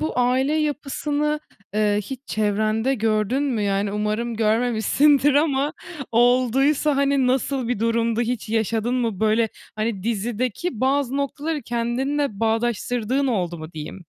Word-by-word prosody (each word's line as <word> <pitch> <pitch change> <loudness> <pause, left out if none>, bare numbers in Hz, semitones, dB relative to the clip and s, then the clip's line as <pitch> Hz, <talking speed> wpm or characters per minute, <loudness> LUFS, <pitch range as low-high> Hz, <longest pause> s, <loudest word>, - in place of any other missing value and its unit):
bu 310 -5 -2
aile 255 +3 +2
yapısını, 300 0 -1 0.3
eee, 210 -1 +2
hiç 260 +3 -7
çevrende 215 +4 0
gördün 220 +3 0
mü? 250 -7 0
Yani 200 0 0
umarım 215 +3 -2
görmemişsindir 245 +6 +3
ama 290 -1 +2 0.4
olduysa 255 +5 +3
hani 280 -1 +2
nasıl 260 -1 0
bir 245 - -1
durumdu? 230 +1 +1
Hiç 240 -1 -2
yaşadın 225 +2 0
mı? 230 -6 -1
Böyle, 220 +1 +2 0.3
hani, 215 -3 -2
dizideki 235 - -2
bazı 270 0 +1
noktaları 290 +2 -2
kendinle 240 +1 -1
bağdaştırdığın 240 +3 0
oldu 180 -9 -1
mu 155 +1 -9
diyeyim? 160 +3 -8
240 Hz, 125 wpm, -23 LUFS, 215-275 Hz, 0.4 s, görmemişsindir